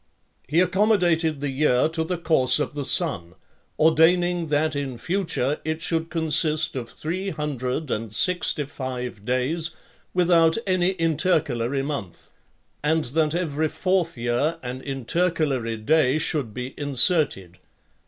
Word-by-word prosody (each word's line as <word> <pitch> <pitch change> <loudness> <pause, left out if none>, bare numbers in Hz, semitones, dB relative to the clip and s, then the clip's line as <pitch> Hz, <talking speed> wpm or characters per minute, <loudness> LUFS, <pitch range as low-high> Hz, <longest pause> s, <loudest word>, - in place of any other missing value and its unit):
He 160 +6 +3
accommodated 180 -6 +2
the 145 -1 -2
year 130 -1 +2
to 160 0 -2
the 175 +2 -3
course 145 -7 +3
of 150 - -2
the 145 -2 -4
sun, 95 - 0 0.4
ordaining 165 +2 +3
that 150 0 +1
in 135 -3 -4
future 165 -3 -1
it 160 +1 -2
should 165 0 -1
consist 155 -1 +2
of 120 -3 -5
three 185 +5 -4
hundred 150 -3 -3
and 110 0 -3
sixty 175 - +1
five 125 -6 -6
days 155 +7 0 0.4
without 170 -2 +3
any 185 -1 +1
intercalary 155 -7 0
month; 135 - -6 0.5
and 160 +1 +1
that 160 0 +1
every 160 -3 -1
fourth 185 -4 -1
year 120 +8 0
an 125 +1 -5
intercalary 135 -3 -1
day 130 +5 +2
should 150 -6 -1
be 125 +4 -6
inserted. 140 - +1
155 Hz, 130 wpm, -24 LUFS, 130-165 Hz, 0.5 s, He